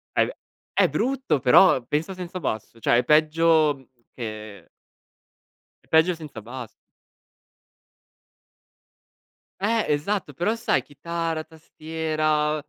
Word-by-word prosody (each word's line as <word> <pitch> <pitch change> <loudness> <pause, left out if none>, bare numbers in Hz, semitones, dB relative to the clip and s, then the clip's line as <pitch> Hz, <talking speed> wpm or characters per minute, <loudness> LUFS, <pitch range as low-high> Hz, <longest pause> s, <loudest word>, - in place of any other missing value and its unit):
È - - +4
v - - -5 0.4
è - - +4
brutto, 260 - 0
però 130 +2 +5
pensa 155 +8 -2
senza 185 0 -6
basso; 110 - -4
cioè 115 +2 +3
è - - 0
peggio, 155 +1 +4
mhmm, 135 -1 -19 0.3
che 110 -5 -8 1.2
è - - -29
peggio 160 +3 +4
senza 150 -8 -9
bass 120 +1 -8 2.9
Eh, 220 +2 +1
esatto, 155 +1 -2
però 175 - 0
sai 230 0 +1
chitarra, 165 +1 -4
tastiera, 155 -1 -2
155 Hz, 110 wpm, -24 LUFS, 135-170 Hz, 2.9 s, però